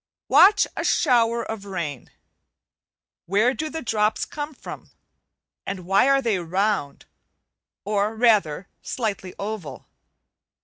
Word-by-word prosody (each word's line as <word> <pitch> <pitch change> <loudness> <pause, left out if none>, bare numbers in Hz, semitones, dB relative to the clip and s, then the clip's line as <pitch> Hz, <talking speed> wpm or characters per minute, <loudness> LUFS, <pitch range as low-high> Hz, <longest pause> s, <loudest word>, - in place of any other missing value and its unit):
Watch 410 +2 +6
a - - -3
shower 235 -1 +2
of 220 -3 -6
rain. 165 -9 -5 1.2
Where 210 +7 +3
do 310 +3 -4
the 320 0 -6
drops 215 -2 0
come 295 0 -6
from? - - -10 0.7
and 190 -2 -6
why 195 +8 +4
are 275 0 +3
they 220 -5 +1
round, 180 -3 -1 0.8
or 210 +1 0
rather 205 -7 +2
slightly 200 -6 -4
oval? 200 -6 -6
210 Hz, 115 wpm, -23 LUFS, 190-240 Hz, 1.2 s, Watch